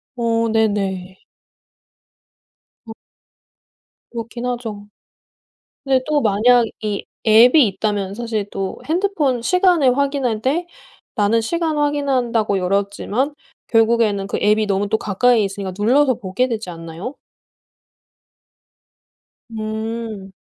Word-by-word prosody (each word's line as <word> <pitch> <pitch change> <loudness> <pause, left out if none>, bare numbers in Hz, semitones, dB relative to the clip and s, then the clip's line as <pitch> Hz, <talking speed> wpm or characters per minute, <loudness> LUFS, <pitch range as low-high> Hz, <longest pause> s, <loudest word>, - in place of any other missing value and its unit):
어. 230 -1 0
네네. 195 -4 -1 1.7
아. 220 - -7 1.2
그렇긴 235 +1 -6
하죠. 225 -5 -5 1.0
근데 265 -2 +2
또 300 -1 +1
만약 235 +2 +4 0.2
이 210 -2 -3 0.2
앱이 240 +6 +7
있다면 200 -1 -2
사실 220 -3 -3
또 195 -1 -4
핸드폰 320 -8 0
시간을 345 -5 +3
확인할 275 -6 0
때 310 +8 0 0.5
나는 215 +2 +2
시간 320 +6 -1
확인한다고 260 -8 0
열었지만 200 +8 -1 0.3
결국에는 225 -3 +2
그 - - -3
앱이 215 +1 +3
너무 200 0 0
또 220 - +2
가까이 220 +2 +2
있으니까 195 -1 -4
눌러서 255 +6 +3
보게 225 +3 -2
되지 220 -6 -4
않나요? 165 - -7 2.4
음. 220 -2 -5
225 Hz, 215 characters per minute, -19 LUFS, 205-255 Hz, 2.4 s, 앱이